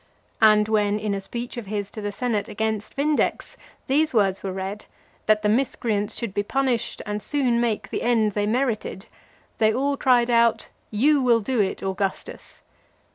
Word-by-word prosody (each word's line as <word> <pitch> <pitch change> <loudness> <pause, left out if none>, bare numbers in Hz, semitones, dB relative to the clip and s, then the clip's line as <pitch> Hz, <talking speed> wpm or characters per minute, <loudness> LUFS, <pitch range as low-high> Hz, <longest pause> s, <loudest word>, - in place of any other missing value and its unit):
And 215 -1 +6
when, 210 -1 +1
in 210 -1 -2
a 195 - -3
speech 240 +5 -6
of 230 -4 -6
his 205 -1 -3
to 215 - -7
the 205 0 -3
senate 220 -1 -2
against 220 0 -3
Vindex, 295 +2 0 0.3
these 300 +1 +1
words 195 -3 +2
were 195 - -3
read, 190 +2 -5 0.4
"that 215 0 +3
the - - +2
miscreants 215 -3 0
should 230 -5 -4
be 205 - +1
punished 250 +1 -1
and 210 0 -3
soon 250 -4 +1
make 230 -3 -1
the - - -2
end 225 -3 +2
they 205 0 -1
merited," 225 -4 -1 0.5
they 220 -1 +4
all 275 +4 0
cried 245 -3 +3
out, 235 -1 +3 0.2
"You 280 +7 +3
will 240 -3 +4
do 235 +1 0
it, 190 - -2
Augustus." 195 0 -4
220 Hz, 175 wpm, -24 LUFS, 205-245 Hz, 0.5 s, And